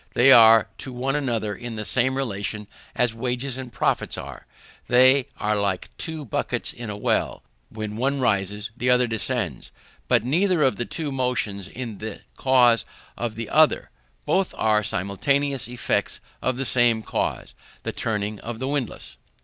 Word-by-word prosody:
They 135 +3 +6
are 115 -3 +8
to 130 - -6
one 130 +3 -2
another 115 -7 -1
in 120 -1 -7
the 110 0 -4
same 130 +3 +1
relation 105 -4 -3 0.3
as 120 -2 +1
wages 125 +2 -2
and 130 -2 -7
profits 110 - -1
are. - - -9 0.4
They 130 +2 +5
are 105 +1 0
like 100 -3 -2
two 160 -3 -6
buckets 110 - -2
in 120 -2 -7
a 105 - -5
well: 105 - 0 0.3
when 110 -1 -6
one 135 +3 0
rises, 105 -2 0
the 125 0 -1
other 125 0 +5
descends, 115 - -2 0.4
but 120 -3 +3
neither 170 +5 +2
of 130 - +2
the 120 - -2
two 155 -4 -4
motions 125 -7 -1
is 115 -5 -7
the 110 -1 -6
cause 125 -3 +4 0.3
of 115 -2 -4
the 115 0 -5
other; 155 0 +3 0.3
both 190 -1 +1
are 110 -1 +3
simultaneous 115 +7 -1
effects 125 0 -1 0.2
of 130 -1 -1
the 135 - -2
same 120 -3 +3
cause, - - -3 0.3
the - - -2
turning 105 -2 -2
of 120 -1 -6
the 130 +3 -3
windlass. 140 -5 -4
120 Hz, 165 wpm, -24 LUFS, 110-130 Hz, 0.4 s, are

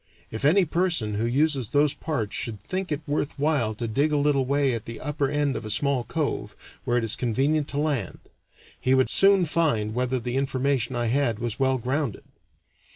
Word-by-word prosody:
If 110 +4 -6
any 180 +7 +5
person 165 - 0
who 110 +3 -1
uses 135 -2 +1
those 145 0 +3
parts 120 -11 -3
should 110 -3 -3
think 185 - -3
it 150 0 -1
worth 145 0 -2
while 140 -7 +1
to 115 +2 -4
dig 140 +7 +1
a 150 - +2
little 140 -2 +2
way 140 -1 +2
at 115 -1 -4
the 115 -1 -7
upper 145 -2 -1
end 145 -1 0
of - - -4
a 110 - -6
small 125 +3 0
cove, 155 -3 -3 0.3
where 120 - +1
it 120 - 0
is 115 -1 +1
convenient 140 +5 0
to 140 - -4
land, 145 - -1 0.6
he 130 +1 +2
would 130 -1 +2
soon 195 -2 +5
find 145 -10 0
whether 125 +1 0
the 125 +2 -3
information 135 -2 0
I 120 0 0
had 120 -1 +1
was 120 +1 -4
well 130 -1 +2
grounded. 130 -1 -2
135 Hz, 200 wpm, -25 LUFS, 120-150 Hz, 0.6 s, any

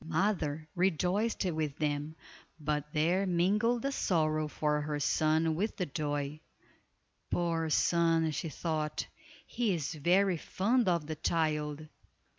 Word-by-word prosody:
The - - -13
mother 160 -3 0
rejoiced 190 +5 +1
with 155 -5 -2
them, 150 0 -2 0.4
but 150 0 -2
there 175 +6 +2
mingled 210 +8 +2
a 275 - +1
sorrow 155 - +1
for 150 0 0
her 150 0 -2
son 155 +2 +2
with 200 +8 -2
the 185 - 0
joy. 145 0 -3 0.9
"Poor 165 -2 0
son," 165 0 +3
she 160 +2 -3
thought, 155 -1 -2 0.4
"He 225 -6 0
is 160 -1 -3
very 180 +4 +3
fond 225 +9 +1
of 170 -3 +1
the 155 0 -5
child." 155 -2 -1
160 Hz, 130 wpm, -31 LUFS, 150-180 Hz, 0.9 s, son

